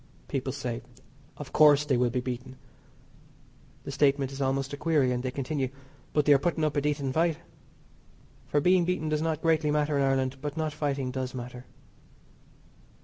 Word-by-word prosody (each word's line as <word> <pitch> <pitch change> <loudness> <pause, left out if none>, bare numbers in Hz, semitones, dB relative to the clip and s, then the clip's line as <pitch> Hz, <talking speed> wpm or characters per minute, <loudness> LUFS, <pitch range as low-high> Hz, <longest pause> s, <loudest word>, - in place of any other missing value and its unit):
People 135 -1 -2
say: 120 -2 -4 0.6
"Of 145 - -9
course, 150 -1 +6
they 140 -3 +2
will 125 0 +2
be 125 +1 -1
beaten." 125 +1 -5 1.3
The - - -6
statement 140 -1 +2
is 135 +1 -6
almost 135 +1 -1
a - - -4
query, 145 -5 +2
and 125 0 -1
they 130 - -2
continue, 135 0 -2 0.4
"but 150 -1 +2
they 145 - +7
are 140 - +5
putting 160 +1 0
up 155 -1 0
a 145 - +2
decent 140 -2 -1
fight." 165 0 +2 1.1
For 145 - +2
being 180 +4 +4
beaten 175 -3 -1
does 155 0 0
not 160 -1 -1
greatly 160 -2 +2
matter 150 0 +1
in - - +3
Ireland, 135 -1 +1
but 145 +1 -5
not 155 -2 -1
fighting 140 -3 -2
does 130 0 -4
matter. 125 0 -7
140 Hz, 180 wpm, -28 LUFS, 130-150 Hz, 1.3 s, they